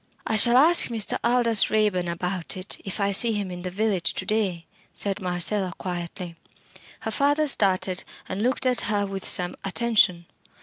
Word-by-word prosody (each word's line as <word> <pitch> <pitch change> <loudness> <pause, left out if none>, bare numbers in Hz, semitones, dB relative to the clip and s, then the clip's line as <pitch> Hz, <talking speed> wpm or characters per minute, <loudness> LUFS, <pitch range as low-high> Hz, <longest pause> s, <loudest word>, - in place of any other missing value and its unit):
"I 220 - -1
shall 235 +3 +5
ask 330 +6 +6
Mr. 225 -4 -1
Aldous 235 -3 +4
Raeburn 210 -5 0
about 180 +1 -4
it, 185 +1 -3
if 195 +2 -6
I 200 0 0
see 225 +4 +5
him 200 -3 -4
in 180 0 -8
the 180 - -5
village 190 -3 -2
to 190 - -5
day," 195 -5 -2 0.3
said 200 +1 -1
Marcella, 180 +1 -1
quietly. 175 -1 -6 0.7
Her - - -4
father 290 +2 +1
started, 190 -6 +1 0.2
and 190 +2 -5
looked 255 +3 0
at 250 -2 +1
her 205 -1 0
with 195 -1 -6
some 180 -1 +1
attention. 195 -4 +1
200 Hz, 170 wpm, -24 LUFS, 180-225 Hz, 0.7 s, ask